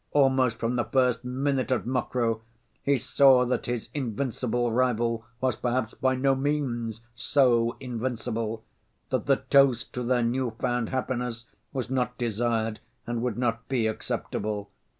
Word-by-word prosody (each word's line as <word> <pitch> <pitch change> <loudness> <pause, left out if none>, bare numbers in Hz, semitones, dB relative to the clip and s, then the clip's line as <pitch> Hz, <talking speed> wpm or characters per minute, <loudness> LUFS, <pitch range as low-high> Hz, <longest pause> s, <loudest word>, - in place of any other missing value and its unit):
Almost 130 -4 +3
from 115 +2 -1
the 120 - +1
first 125 -2 +2
minute 130 +1 -1
at 130 - +1
Mokroe 120 -2 0 0.4
he 140 0 +2
saw 130 0 +5
that 125 - -1
his 120 -2 -3
invincible 120 -2 -1
rival 115 -2 +1
was 130 0 +1
perhaps 120 -2 -1
by 130 -1 +1
no 135 +1 +3
means 130 -5 -1
so 120 -1 +3
invincible, 115 -3 -3 0.5
that - - -1
the - - +3
toast 135 -4 +4
to 125 - -3
their 125 0 +2
new‐found 120 -1 -1
happiness 125 -2 -2 0.3
was 130 -2 -3
not 125 -1 0
desired 115 -1 0 0.3
and 120 0 -2
would 120 -3 -1
not 115 -2 -1
be 125 -4 +1
acceptable. 105 -1 -3
125 Hz, 140 wpm, -27 LUFS, 115-130 Hz, 0.5 s, saw